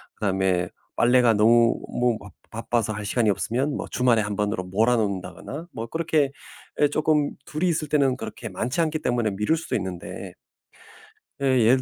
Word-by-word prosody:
그다음에 95 -3 0 0.3
빨래가 120 -1 +4
너무 115 +2 +4 0.2
뭐 120 -2 +2
막 100 -1 -12 0.2
바빠서 115 -1 -1
할 105 - -5
시간이 110 +2 +1
없으면 120 +8 0
뭐 - - -3
주말에 120 -3 +3
1 105 -1 -3
번으로 105 -2 -1
몰아 110 +7 +2
놓는다거나 100 - -3
뭐 115 0 -5
그렇게 155 -2 +1 0.5
예 145 - +5
조금 150 0 +1
둘이 155 +4 -1
있을 155 -3 -1
때는 140 -4 +3
그렇게 115 - -7
많지 120 - -3
않기 155 -1 0
때문에 120 -6 0
미룰 105 +11 +1
수도 165 - -4
있는데 95 -4 -5 1.1
예. 140 - 0 0.2
예를 130 +3 +5
115 Hz, 345 characters per minute, -24 LUFS, 105-140 Hz, 1.1 s, 예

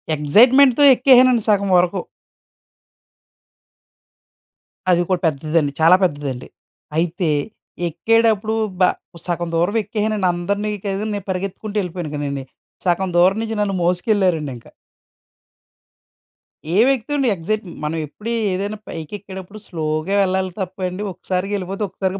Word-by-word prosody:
ఎక్సైట్మెంట్‌తో 245 - +5
ఎక్కేసానండి 255 -2 +5
సగం 200 -1 +2
వరకు. 180 +2 +1 2.9
అది 175 -1 +3
కూడా 185 -2 +1
పెద్దదండి, 155 0 0
చాలా 165 +3 +7
పెద్దదండి. 145 -7 -2 0.5
అయితే, 170 +1 0 0.6
ఎక్కేటప్పుడు 220 +4 +1 0.2
బ - - +4 0.4
సగం 175 -1 -2
దూరం 175 +6 +1
ఎక్కేసానండి. 210 -1 -1
అందరిని 200 +4 -2
కాదని, 200 +2 -2
నేను 200 -2 -6
పరిగెత్తుకుంటూ 195 +3 -4
యెళ్ళిపోయాను 175 -4 -5
గానండి. 140 -2 -3 0.4
సగం 185 +1 +1
దూరం 185 +3 +4
నుంచి 225 0 -4
నన్ను 200 -2 -1
మోసుకెళ్లారండి 175 - +1
ఇంకా. 115 - -17 2.0
ఏం 220 +7 +5
ఎక్కుతామండి? 270 +1 -1
ఎగ్సైట్ 210 +5 -3 0.2
మనం 155 +2 -2
ఎప్పుడూ 210 +10 -7 0.2
ఏదైనా 200 +3 -3
పైకెక్కేటప్పుడు 190 +4 -8
స్లోగా 155 +1 -2
యెళ్ళాలి 190 -1 0
తప్పండి. 185 0 -4
ఒక్కసారిగా 185 +2 -3
వెళ్ళిపోతే 195 +2 -4
ఒక్కసారిగా 190 +1 -3
190 Hz, 110 wpm, -20 LUFS, 170-210 Hz, 2.9 s, చాలా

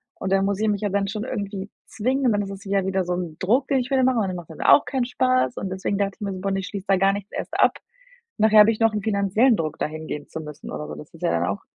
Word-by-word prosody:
Und 190 0 -2
dann 195 0 +3
muss 200 0 0
ich 220 - +1
mich 205 -1 0
ja 205 - 0
dann 200 0 0
schon 210 +2 -4
irgendwie 200 -3 -4 0.2
zwingen. 255 +5 -1
Und 230 - +4
dann 205 - +1
es 195 - -5
ist 195 +1 -9
ja 195 -1 0
wieder 190 -1 0
so 180 - -1
'n 175 -3 -4
Druck, 230 +9 +1
den 270 -2 +3
ich 250 - -3
wieder 265 -1 +2
mache 255 -2 +3
und 200 - 0
dann 185 - -3
macht 175 -2 -8
mir 160 - -10
das - - -2
auch - - +7
keinen 260 -3 -1
Spaß 255 0 +1
und 195 - -4
deswegen 190 +1 -2
dachte 200 -1 -1
ich - - -36
mir 200 -1 -2
so: 185 - -6
„Boah, 195 0 -1
ne, 195 - 0
ich 190 - -5
schließe 200 -1 -6
da 195 -1 +4
gar 195 +1 +3
nichts 200 0 -6
erst - - -4
ab. - - +4 0.6
Nachher 215 0 +6
habe 210 +2 +7
ich 225 - -3
noch 225 -1 +3
'n 210 - -2
finanziellen 215 +3 +3
Druck, 155 -2 -3
da - - 0
hingehen 155 -1 -6
zu 160 - -6
müssen 150 -2 -9
oder 75 -1 -5
so.“ 75 - -6
Das 75 - -12
ist - - -16
ja - - +2
dann 85 +1 +1
auch 100 0 -3
200 Hz, 325 wpm, -23 LUFS, 185-220 Hz, 0.6 s, auch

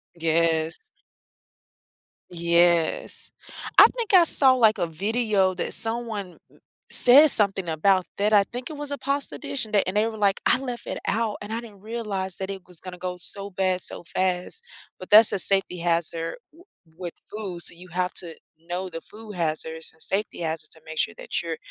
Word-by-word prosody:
Yes. 165 -1 +1 1.5
Yes. 170 -1 +1 0.5
I - - +11
think 465 -4 -2
I 365 -2 +9
saw 270 -4 +4
like, 225 -4 +4
a 175 - 0
video 200 +2 +1
that - - -3
someone 225 -5 -4 0.5
says 285 +4 +6
something 195 -3 0
about 185 +4 +3
that, 205 +1 +2
I 205 -2 +6
think 245 +3 -7
it 310 - -7
was 290 0 -6
a 285 - -2
pasta 280 +1 -2
dish 280 -4 -2
and 215 - -14
they 205 - +4
and 190 +2 -1
they 215 +2 +3
were 225 -1 -5
like, 200 -2 +2
I - - +5
left 250 -3 -6
it - - -3
out 225 -1 0
and 205 +1 -7
I 225 - -1
didn't 215 -5 -12
realize 205 -4 -4
that 190 0 -4
it 195 -1 -5
was 180 -2 -14
gonna 185 -1 -8
go 180 0 -4
so 200 +3 -7
bad 185 0 0
so - - -10
fast, 185 - -2 0.3
But 185 - -10
that's 215 +1 +8
a - - 0
safety 195 -2 0
hazard 165 -1 -1 0.2
w 335 +3 -18 0.3
with 175 -2 -5 0.2
food, 195 -5 -5
so 170 - -1
you 180 +2 -11
have 180 +2 -1
to, 170 -3 -6 0.3
know 180 +2 -2
the 165 -2 -7
food 215 +2 -11
hazards 160 -1 -3
and 160 - -19
safety 205 +5 -2
hazards 160 -1 -3
to 160 - -10
make 160 0 -8
sure 145 - 0
that - - -3
you're 165 -1 -3
190 Hz, 190 wpm, -25 LUFS, 170-220 Hz, 1.5 s, I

